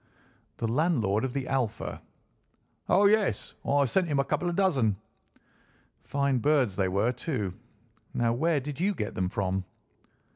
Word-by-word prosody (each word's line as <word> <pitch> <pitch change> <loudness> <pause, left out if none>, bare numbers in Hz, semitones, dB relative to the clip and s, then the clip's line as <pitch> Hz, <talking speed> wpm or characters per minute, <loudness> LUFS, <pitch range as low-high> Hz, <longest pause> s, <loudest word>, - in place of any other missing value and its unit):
"The 115 - -1
landlord 115 - +1
of 130 - -1
the 135 -2 -3
Alpha." 125 -5 -2 0.9
"Oh, 205 - +5
yes; 210 0 +2
I 140 0 +3
sent 180 +8 +1
him 145 -3 0
a 140 - +3
couple 175 +5 -1
of 175 - -2
dozen." 140 - +2 1.1
"Fine 140 -2 0
birds 135 -7 +2
they 95 -1 +1
were, 100 +6 +1
too. 120 - -3 0.6
Now 115 -1 +2
where 155 +4 +1
did 145 +2 -6
you 200 +3 +1
get 105 - -3
them 90 -1 -1
from?" 95 0 -1
135 Hz, 150 wpm, -28 LUFS, 110-160 Hz, 1.1 s, Oh